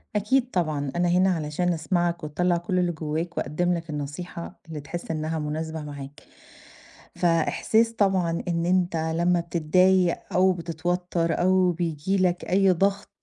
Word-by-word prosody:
أكيد 250 +5 +1
طبعًا، 150 -6 -1
أنا 175 0 +2
هنا 185 +2 +4
علشان 165 +3 -1
أسمعك 175 +1 -1
وتطلّع 175 +4 0
كل 180 +2 -1
اللي 175 -1 +1
جوّاك 160 +2 -4
وأقدّم 175 +4 0
لك 165 -2 -4
النصيحة 155 +4 -6
اللي 160 -2 -6
تحس 170 +4 -6
إنّها 155 0 -2
مناسبة 160 +1 -4
معاك. 145 -1 -9 0.9
فإحساس 180 +7 +2
طبعًا 190 -6 +1
إن 170 -1 0
أنت 180 -1 +1
لمّا 170 +2 +1
بتضايق 175 +2 +2
أو 185 +1 +4
بتتوتَّر 170 0 -2
أو 185 0 +3
بييجي 170 +2 -1
لك 180 -1 +1
أي 195 +1 +3
ضَغْط 195 +3 0
175 Hz, 140 wpm, -25 LUFS, 160-180 Hz, 0.9 s, هنا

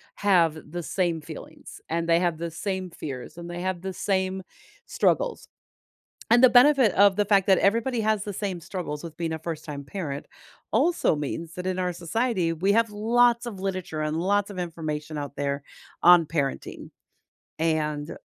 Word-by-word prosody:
have 175 -6 +3
the 175 +2 -5
same 170 -2 -1
feelings, - - -11
and 165 +1 -1
they 165 0 +4
have 175 -2 0
the 170 +1 -4
same 190 +1 -3
fears, 135 -1 -7
and 170 0 -8
they 175 0 -5
have 185 -1 -2
the 190 0 -4
same 190 0 -1 0.4
struggles. - - 0 0.8
And 240 +2 +6
the 255 - +9
benefit 255 -3 +6
of 200 0 +5
the 205 0 +1
fact 200 -2 +3
that 190 -2 +6
everybody 230 +4 +1
has 215 -2 +1
the 205 - -5
same 190 -2 -3
struggles 170 -3 -5
with 165 -2 -9
being 165 -1 -2
a 160 - -4
first-time 155 -3 -6
parent 145 -3 -5 0.5
also 290 - +2
means 155 +3 -4
that 180 0 -5
in 185 0 -1
our 180 -1 -1
society, 180 0 -1
we 185 +5 +1
have 230 -1 +2
lots 235 +3 +3
of 205 -5 -6
literature 185 -5 -3
and 155 0 -1
lots 200 +3 +1
of 190 -3 -7
information 155 -3 -4
out 145 -1 -5
there 140 0 -2 0.4
on 175 -1 +8
parenting. 145 -4 -3 0.7
And 155 -2 -1
180 Hz, 175 wpm, -26 LUFS, 160-205 Hz, 0.8 s, the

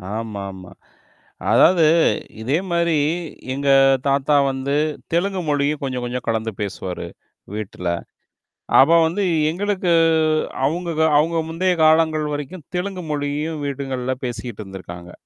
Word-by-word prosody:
ஆமா, 110 -3 -4
ஆமா. 95 -1 -12 0.8
அதாவது 170 -3 +5 0.6
இதேமாரி 170 +5 0 0.6
எங்க 140 +1 -1 0.4
தாத்தா 140 +1 +2 0.2
வந்து 135 +1 -2 0.4
தெலுங்கு 185 +2 0
மொழியும் 145 +1 0
கொஞ்சம் 130 -2 -3
கொஞ்சம் 125 +1 -4
கலந்து 110 0 -1
பேசுவாரு 95 -2 -5 0.5
வீட்ல. 95 -4 -4 0.9
அப்ப 160 +5 +6
வந்து 195 +5 -1 0.3
எங்களுக்கு 190 -1 -1 0.7
அவுங்க 170 +3 -1 0.3
அவுங்க 165 +2 +2
முந்தைய 180 +3 +1
காலங்கள் 155 -1 +3
வரைக்கும் 145 +3 -6
தெலுங்கு 180 0 -3
மொழியும் 150 +2 -2
வீடுங்கள்ல 130 -2 -3
பேசிக்கிட்டு 120 -2 -5
இருந்திருக்காங்க. 90 -2 -10
145 Hz, 105 wpm, -21 LUFS, 120-170 Hz, 0.9 s, அப்ப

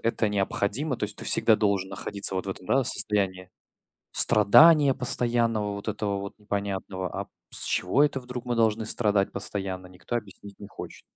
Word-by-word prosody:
это 115 -1 0
необходимо. 105 +7 -1
То 105 - -2
есть 105 +1 -5
ты - - -9
всегда 110 -2 +4
должен 100 -3 0
находиться 100 0 -1
вот 95 +1 -3
в - - -2
этом, 90 -1 -9
да, 135 +4 +2
состоянии 95 -5 0 0.6
страдания 145 +7 +6
постоянного, 115 -4 0
вот 100 +2 -8
этого 100 -1 -3
вот 100 0 -7
непонятного. 100 -2 -4
А - - -7
п - - -36 0.2
с - - +1
чего 130 +11 +1
это 145 -2 0
вдруг 125 0 -8
мы 120 - -2
должны 110 -1 +1
страдать 105 -3 0
постоянно, 95 -2 -5
никто 90 +6 -7
объяснить 100 -2 -8
не 100 - -10
хочет. - - -10
105 Hz, 175 wpm, -26 LUFS, 100-115 Hz, 0.6 s, страдания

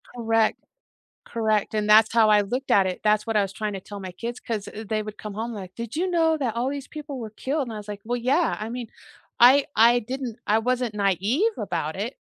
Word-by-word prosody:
Correct. 225 -2 +1 0.7
Correct, 220 -3 0
and 210 -1 0
that's 220 +1 +6
how 225 -2 +5
I 210 -1 +5
looked 250 +7 -4
at 195 -1 +5
it, 185 -1 -3
that's 210 +1 +2
what 225 - -2
I - - +5
was 195 - -4
trying 210 +1 -3
to 195 - -5
tell 205 +2 -9
my 185 -2 -7
kids 235 +6 -6
'cause 215 -4 -4
th 220 +1 -8
they 215 -1 0
would 215 0 -8
come 210 -1 -7
home 225 +3 -4
like, 185 -2 -8
"Did 235 +3 -6
you 360 +3 0
know 325 -2 +3
that 255 -7 -2
all 240 +2 -1
these 280 0 -5
people 295 -3 -7
were 225 -3 -6
killed?" 275 +7 -2
And 230 - -6
I 215 - -5
was 210 0 -10
like, 205 -1 -6
"Well, 245 +2 -1
yeah," 275 +8 +1
I 215 - -4
mean, 240 -1 -5 0.5
I 265 +4 +7
I 235 +2 +5
didn't 250 0 -5
I 215 +2 +3
wasn't 245 -1 -1
naive 205 - +1
about - - -3
it, - - -4
225 Hz, 245 wpm, -24 LUFS, 210-250 Hz, 0.7 s, I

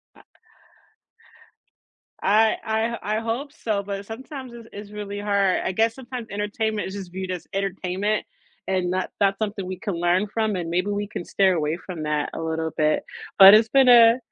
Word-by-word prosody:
I - - -18 2.0
I 215 +2 +3 0.4
I 215 +1 -1
I - - 0
hope 235 +6 -3
so, 215 -9 -2
but 200 0 -5
sometimes 260 +3 -8
it's 230 -1 -11
it's 205 0 -9
really 205 -1 -6
hard. 200 -2 +1
I - - -1
guess 225 +4 +1
sometimes 250 -3 -7
entertainment 210 +1 -2
is 190 - -7
just 190 -3 -7
viewed 185 0 -5
as 180 - -6
entertainment, 195 +1 -2 0.4
and 185 -2 0
not 185 0 -2
that's 195 -1 +2
something 205 -3 -3
we 185 0 -5
can 205 -6 -3
learn 175 +4 +1
from, 220 0 -1
and 175 -2 -3
maybe 180 +4 0
we 205 0 -2
can 175 - -6
stay 195 -1 +2
away 155 -2 -1
from 175 -5 -6
that 150 -1 -1
a - - -5
little 160 0 -2
bit. 155 0 +1 0.4
But 195 +1 +11
it's 220 +1 +5
been 270 0 +5
a 235 -1 +8
200 Hz, 185 wpm, -23 LUFS, 185-220 Hz, 2.0 s, But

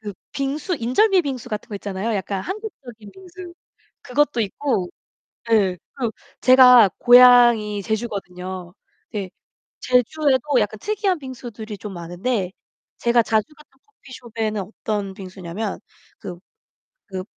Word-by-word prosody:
그 205 -2 -7 0.2
빙수 290 +5 -2
인절미 375 - +3
빙수 270 -7 -5
같은 210 -1 -5
거 210 - -7
있잖아요. 200 +2 -3
약간 195 -1 -3
한국적인 260 - -8
빙수 365 -1 -12 0.5
그것도 275 -1 +1
있고 205 -3 -2 0.6
예. 200 -5 +3 0.2
그리고 240 -4 -2 0.3
제가 250 -4 +8
고향이 240 -4 +6
제주거든요. 185 -4 -5 0.4
네. 195 -4 -5 0.5
제주에도 260 +1 +2
약간 215 0 -1
특이한 405 - -1
빙수들이 235 -5 -8
좀 210 -2 -7
많은데 180 +4 -3 0.5
제가 235 0 +3
자주 220 +1 +1
갔던 290 -3 -22
커피숍에는 230 - -5
어떤 205 0 -4
빙수냐면 190 +2 -6 0.4
그 180 -2 -8 0.7
그 190 -1 -5
230 Hz, 275 characters per minute, -21 LUFS, 200-265 Hz, 0.7 s, 제가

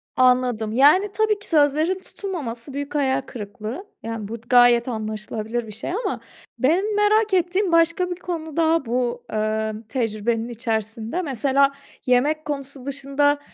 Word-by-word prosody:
Anladım. 250 -4 +3
Yani, 305 - +5
tabii 435 -1 +1
ki 410 - -12
sözlerin 310 +4 +3
tutulmaması 280 - -6
büyük 285 +1 -5
hayal 270 -2 +2
kırıklığı. 220 - -7 0.2
Yani, 225 -2 -4
bu 225 - -5
gayet 245 -1 +6
anlaşılabilir 220 +1 -3
bir 215 - -8
şey 220 +9 -5
ama 440 +7 -2 0.4
benim 370 +10 +2
merak 415 0 +3
ettiğim 365 +1 +2
başka 335 +2 +3
bir 355 - -2
konu 335 -4 -6
daha 330 -2 +3
bu, 240 0 -1
ııı, 215 0 -1
tecrübenin 230 -1 -1
içerisinde. 225 - -3
Mesela 275 -1 +2 0.3
yemek 290 +5 +2
konusu 275 -2 -5
dışında 280 +1 +1
270 Hz, 135 wpm, -23 LUFS, 230-330 Hz, 0.4 s, gayet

